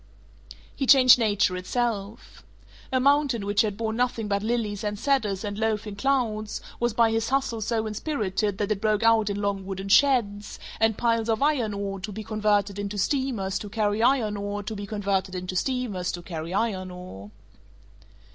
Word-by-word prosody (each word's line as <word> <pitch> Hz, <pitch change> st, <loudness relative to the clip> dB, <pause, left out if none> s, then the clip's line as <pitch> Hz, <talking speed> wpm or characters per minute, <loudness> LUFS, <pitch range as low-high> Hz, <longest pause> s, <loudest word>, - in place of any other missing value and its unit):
He 270 Hz, -, -2 dB
changed 255 Hz, -2 st, +8 dB
nature 205 Hz, -4 st, +2 dB
itself. 215 Hz, +2 st, -3 dB, 0.5 s
A 260 Hz, -, +2 dB
mountain 275 Hz, -5 st, +2 dB
which 205 Hz, 0 st, +2 dB
had 210 Hz, -3 st, -2 dB
borne 220 Hz, 0 st, -2 dB
nothing 240 Hz, -3 st, 0 dB
but 200 Hz, -1 st, 0 dB
lilies 215 Hz, -2 st, -2 dB
and 210 Hz, 0 st, -2 dB
cedars 215 Hz, -6 st, 0 dB
and 205 Hz, 0 st, -4 dB
loafing 215 Hz, -2 st, -1 dB
clouds 220 Hz, -3 st, -1 dB, 0.2 s
was 240 Hz, 0 st, +1 dB
by 225 Hz, 0 st, +3 dB
his 225 Hz, 0 st, 0 dB
Hustle 265 Hz, -4 st, 0 dB
so 220 Hz, +1 st, -1 dB
inspirited 210 Hz, -4 st, -2 dB
that 205 Hz, 0 st, -2 dB
it 205 Hz, -2 st, -1 dB
broke 215 Hz, 0 st, +1 dB
out 225 Hz, -2 st, +4 dB
in 200 Hz, 0 st, -2 dB
long 200 Hz, -1 st, -1 dB
wooden 195 Hz, 0 st, -5 dB
sheds, 210 Hz, -5 st, +3 dB, 0.2 s
and 220 Hz, -1 st, +2 dB
piles 230 Hz, -1 st, +1 dB
of 225 Hz, +4 st, +1 dB
iron 250 Hz, -9 st, +1 dB
ore 200 Hz, -1 st, -4 dB
to 195 Hz, +3 st, -6 dB
be 215 Hz, +2 st, -6 dB
converted 210 Hz, -2 st, 0 dB
into 205 Hz, 0 st, -4 dB
steamers 205 Hz, -4 st, -1 dB
to 205 Hz, -, -7 dB
carry 210 Hz, 0 st, 0 dB
iron 230 Hz, -4 st, +2 dB
ore 205 Hz, 0 st, -4 dB
to 215 Hz, +2 st, -5 dB
be 200 Hz, 0 st, -6 dB
converted 195 Hz, -2 st, -1 dB
into 185 Hz, 0 st, -4 dB
steamers 210 Hz, -5 st, -1 dB
to 175 Hz, -, -6 dB
carry 165 Hz, -1 st, -6 dB
iron 190 Hz, -2 st, -1 dB
ore. 180 Hz, -, -10 dB
210 Hz, 175 wpm, -26 LUFS, 200-230 Hz, 0.5 s, changed